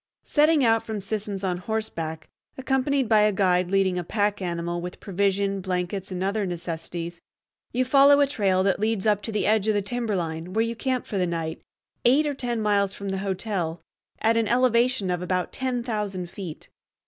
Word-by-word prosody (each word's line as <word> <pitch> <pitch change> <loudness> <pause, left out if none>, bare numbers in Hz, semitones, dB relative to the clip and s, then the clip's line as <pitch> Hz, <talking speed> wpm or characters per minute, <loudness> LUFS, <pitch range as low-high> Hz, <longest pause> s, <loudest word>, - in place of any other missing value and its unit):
Setting 300 -1 +4
out 225 -1 +4
from 220 -2 -4
Sisson's 200 -1 -4
on 180 -2 -1
horseback, 170 -7 -4 0.3
accompanied 265 0 +1
by 215 -1 +5
a 210 0 +4
guide 180 -2 +2
leading 190 -2 +2
a - - -3
pack 205 +2 0
animal 175 -1 -2
with 180 +1 -7
provision, 195 0 0
blankets, 185 +1 -3
and 185 0 -3
other 200 +2 0
necessaries, 170 0 -5 0.5
you 255 +2 +1
follow 280 +2 +6
a 285 - +6
trail 195 -9 +1
that 195 -2 +1
leads 215 -1 0
up 210 -2 +3
to 225 - -4
the 210 - 0
edge 215 -1 +2
of 215 - +3
the 205 - +2
timberline, 185 -7 -2
where 225 +2 +2
you 230 0 -3
camp 255 +1 -1
for 200 - -3
the 180 - +1
night, 165 -1 -3 0.4
eight 275 +6 +4
or 295 - 0
ten 245 -3 -2
miles 200 -2 +1
from 200 -1 -5
the 190 0 -2
hotel, 190 -4 -2 0.4
at 225 +1 +2
an 225 -2 +2
elevation 240 -3 +2
of 180 -1 -1
about 180 0 -1
ten 255 -2 -2
thousand 205 -6 -3
feet. 180 -6 -8
200 Hz, 190 wpm, -25 LUFS, 180-230 Hz, 0.5 s, follow